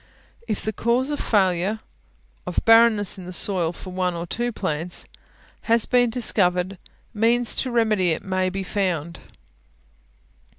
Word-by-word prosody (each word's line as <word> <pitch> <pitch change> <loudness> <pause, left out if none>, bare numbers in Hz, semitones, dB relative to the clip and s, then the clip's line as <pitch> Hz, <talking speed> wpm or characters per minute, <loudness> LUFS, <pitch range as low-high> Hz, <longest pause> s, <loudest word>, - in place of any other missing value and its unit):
If 215 -3 -3
the 215 - -2
cause 245 +6 0
of 290 - -3
failure 190 0 +1 0.7
of - - -1
barrenness 225 -4 +4
in 180 - -9
the - - -6
soil 180 -3 0
for 185 +2 -10
one 180 -1 -1
or 170 0 -4
two 240 +7 -2
plants 175 -4 -3 0.6
has 230 -1 +3
been 245 -1 +3
discovered, 190 -6 0 0.3
means 230 +2 +2
to 260 - -1
remedy 220 -6 +2
it 160 - -1
may 185 -1 -1
readily - - +1
be 195 +1 -4
found. 175 -4 -2
195 Hz, 145 wpm, -23 LUFS, 180-230 Hz, 0.7 s, barrenness